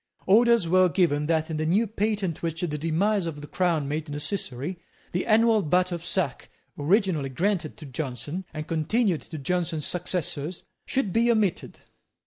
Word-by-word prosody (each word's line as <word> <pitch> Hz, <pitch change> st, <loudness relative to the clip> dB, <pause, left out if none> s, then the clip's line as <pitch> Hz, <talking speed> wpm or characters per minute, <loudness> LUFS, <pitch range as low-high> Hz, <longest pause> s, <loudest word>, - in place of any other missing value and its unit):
Orders 230 Hz, -1 st, +5 dB
were 185 Hz, +1 st, +5 dB
given 150 Hz, -5 st, +2 dB
that, 160 Hz, 0 st, +1 dB
in 155 Hz, -, -2 dB
the 155 Hz, -, -1 dB
new 200 Hz, +8 st, +3 dB
patent 205 Hz, -5 st, -1 dB
which 165 Hz, -1 st, -3 dB
the 165 Hz, -4 st, -1 dB
demise 175 Hz, +5 st, +1 dB
of 150 Hz, -3 st, -5 dB
the -, -, -7 dB
crown 170 Hz, -5 st, 0 dB
made 150 Hz, +2 st, -3 dB
necessary, 145 Hz, 0 st, -3 dB, 0.3 s
the 180 Hz, -, -2 dB
annual 225 Hz, 0 st, +5 dB
butt 180 Hz, +2 st, +2 dB
of 170 Hz, -1 st, -4 dB
sack, 170 Hz, -6 st, -2 dB, 0.3 s
originally 165 Hz, -2 st, +1 dB
granted 175 Hz, +3 st, -1 dB
to 155 Hz, -, -10 dB
Jonson, 145 Hz, +5 st, -4 dB
and 155 Hz, -1 st, -5 dB
continued 170 Hz, +3 st, +1 dB
to 160 Hz, -, -8 dB
Jonson's 165 Hz, 0 st, -1 dB
successors, 175 Hz, -2 st, -3 dB, 0.2 s
should 220 Hz, -9 st, 0 dB
be 235 Hz, +1 st, +3 dB
omitted. 215 Hz, -6 st, 0 dB
170 Hz, 160 wpm, -26 LUFS, 155-195 Hz, 0.3 s, Orders